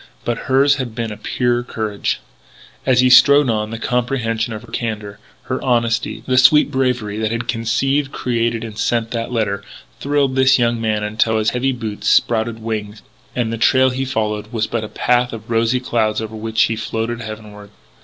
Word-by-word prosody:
But 120 -1 -3
hers 140 +2 +4
had 125 -4 -5
been 115 -1 -3
a - - -5
purer 120 -1 0
courage. 110 -4 -3 0.7
As 125 -1 +4
he 130 - +4
strode 140 0 +7
on, 105 -1 -1
the 115 - -5
comprehension 120 -1 -1
of 110 +1 -6
her 120 - -15
candour, 105 -4 -4 0.2
her 130 - -4
honesty, 120 -2 0
the 130 0 +3
sweet 145 +4 +5
bravery 125 -6 -1
that 110 -1 -1
had 115 0 -3
conceived, 125 +5 0
created, 115 -2 -1
and 110 -2 -8
sent 115 -1 0
that 115 0 -3
letter, 100 -4 -1 0.4
thrilled 140 -2 +1
this 130 0 +5
young 120 -1 +1
man 110 -1 0
until 110 +1 +1
his 110 0 +1
heavy 130 +2 0
boots 110 -5 -3
sprouted 115 0 +2
wings, 105 -2 -5 0.3
and 115 -2 -1
the 115 - -4
trail 130 +1 +4
he 130 +1 -2
followed 110 -4 -2
was 110 -3 0
but 115 0 -3
a 110 - -6
path 125 +2 +1
of 115 +1 -8
rosy 115 +2 +2
clouds 110 -4 0
over 110 0 -6
which 110 0 +1
he 115 - 0
floated 115 +2 -3
heavenward. 105 -2 -9
115 Hz, 185 wpm, -19 LUFS, 110-125 Hz, 0.7 s, strode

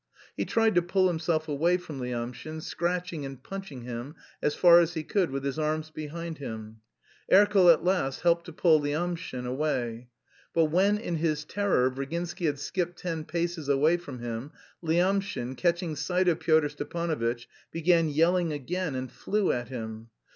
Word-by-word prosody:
He - - -1
tried 225 -1 +2
to 175 - +4
pull 185 +2 +2
himself 160 -2 0
away 165 +5 +2
from 160 -6 -8
Lyamshin, 125 +5 -5
scratching 175 -2 -2
and 135 -1 -8
punching 195 -11 -7
him 125 +5 -6 0.3
as 150 - +1
far 175 -1 +8
as 170 0 +1
he 160 - -2
could 185 +1 +1
with 135 0 -4
his 140 +2 -2
arms 155 0 -1
behind 160 +1 -6
him. 110 -4 -7 0.5
Erkel 195 -2 +7
at 160 - +2
last 180 -8 0
helped 170 0 +3
to 170 - -8
pull 160 -1 +4
Lyamshin 155 -2 -3
away. 125 -3 -2 0.5
But 160 -2 +3
when, 195 +5 +3
in 175 -6 -3
his 155 -2 0
terror, 185 -10 +1
Virginsky 170 +6 -3
had 145 -1 0
skipped 175 +4 -3
ten 165 -3 -4
paces 170 -2 -2
away 150 +5 +4
from 175 -7 -9
him, 120 +4 -5 0.3
Lyamshin, 175 -6 0
catching 170 -1 0
sight 180 +5 0
of 170 -2 +3
Pyotr 155 -2 +3
Stepanovitch, 145 -6 -2 0.3
began 165 -1 +3
yelling 165 +3 +2
again 155 +2 -3
and 130 -1 -4
flew 210 -1 0
at 120 -1 -2
him. 110 -3 -7
160 Hz, 165 wpm, -28 LUFS, 135-175 Hz, 0.5 s, far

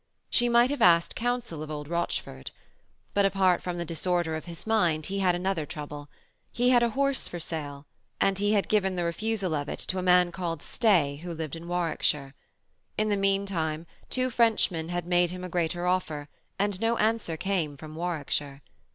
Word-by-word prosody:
She 240 -1 +3
might 240 +2 +5
have 285 -4 -3
asked 170 -4 +5
counsel 240 -9 -2
of 155 - -6
old 150 -1 -5
Rochford. 160 - -3 0.6
But 200 - +3
apart 190 -2 +3
from 180 -1 -4
the 170 - -3
disorder 170 0 0
of 155 - -6
his 170 -1 -8
mind 175 -9 +2
he 195 +1 -2
had 180 -2 +3
another 180 -2 -1
trouble. 145 -1 -7 0.4
He 245 +1 +2
had 245 -1 +6
a 235 - +3
horse 275 -1 +2
for 175 - -6
sale, 145 -3 -4 0.3
and 195 0 +2
he 205 +1 +2
had 200 -2 +2
given 190 -3 +2
the 175 - -1
refusal 195 +1 -1
of 145 -1 -2
it - - -4
to 185 - -2
a - - -1
man 180 -1 +4
called 170 -4 -4
Stey 170 - +2
who 175 +3 -7
lived 160 -2 -4
in 165 +1 -9
Warwickshire. 155 -5 -1 0.6
In 215 0 +1
the 205 - +2
meanwhile 195 -5 0 0.2
two 255 0 0
Frenchmen 210 -8 +2
had 175 -1 -2
made 175 0 +3
him 180 +1 -6
a 180 - -5
greater 175 0 -1
offer, 160 -5 -1 0.3
and 200 0 -1
no 230 +1 +2
answer 215 -7 0
came 170 -6 -1
from 155 +1 -9
Warwickshire. 150 -4 -3
175 Hz, 190 wpm, -28 LUFS, 160-200 Hz, 0.6 s, had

